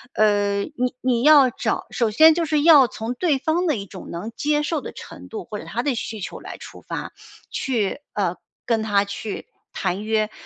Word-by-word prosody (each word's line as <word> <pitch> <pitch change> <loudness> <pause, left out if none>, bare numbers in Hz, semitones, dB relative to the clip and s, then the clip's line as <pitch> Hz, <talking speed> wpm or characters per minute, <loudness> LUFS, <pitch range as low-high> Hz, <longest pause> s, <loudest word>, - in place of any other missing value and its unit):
呃， 205 -1 +2
你 250 -2 -3
你 250 -2 +1
要 285 -2 +7
找 - - -2
首 230 -2 +1
先 315 +9 +7
就 335 +1 0
是 300 -2 +1
要 295 -6 +8
从 225 +2 -5
对 285 +2 +1
方 330 +6 0
的 305 - +2
一 200 - -5
种 190 -2 -10
能 195 +7 -5
接 295 0 +1
受 300 0 -1
的 - - -7
程 - - -11
度， 425 -3 -6
或 210 - -6
者 - - -9
他 240 - -3
的 280 -2 +1
需 220 -2 -5
求 - - -6
来 - - -9
出 - - -12
发， - - -6 0.4
去 235 -2 -1
呃， 185 -4 0 0.3
跟 230 -2 +1
他 205 -2 +2
去 200 +1 -6 0.3
谈 190 +2 -2
约， 215 0 0
235 Hz, 220 characters per minute, -22 LUFS, 210-295 Hz, 0.4 s, 要